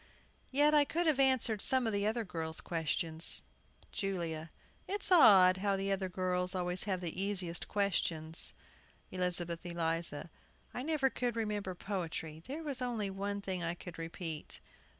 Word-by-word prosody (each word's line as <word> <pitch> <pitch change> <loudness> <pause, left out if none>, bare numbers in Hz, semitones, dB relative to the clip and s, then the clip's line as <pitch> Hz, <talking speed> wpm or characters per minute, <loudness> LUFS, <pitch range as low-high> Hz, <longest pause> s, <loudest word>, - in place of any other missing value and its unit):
Yet 295 +3 +4
I 295 -1 +6
could 340 +4 -1
have 305 -4 +3
answered 255 -6 +3
some 260 -2 +3
of 225 - 0
the 200 +1 +1
other 225 +2 0
girls' 160 -3 -3
questions. 165 0 0 0.5
JULIA. 170 -5 -3 0.4
It's 400 0 -1
odd 190 - +8
how 195 0 +1
the 195 +1 -1
other 190 -1 -1
girls 180 0 -1
always 180 0 0
have 190 -3 -1
the 175 +1 -3
easiest 185 -4 -1
questions. 170 -5 0 0.6
ELIZABETH 175 -2 0
ELIZA. 165 -2 -2 0.4
I - - -3
never 280 -2 +1
could 245 -2 -1
remember 210 -4 -2
poetry 165 -4 -4
There 300 +5 -5
was 280 -4 0
only 225 -5 -1
one 200 +1 -3
thing 185 -3 -3
I 170 +1 -1
could 175 -1 -10
repeat. 165 -1 -5
190 Hz, 150 wpm, -34 LUFS, 170-225 Hz, 0.6 s, odd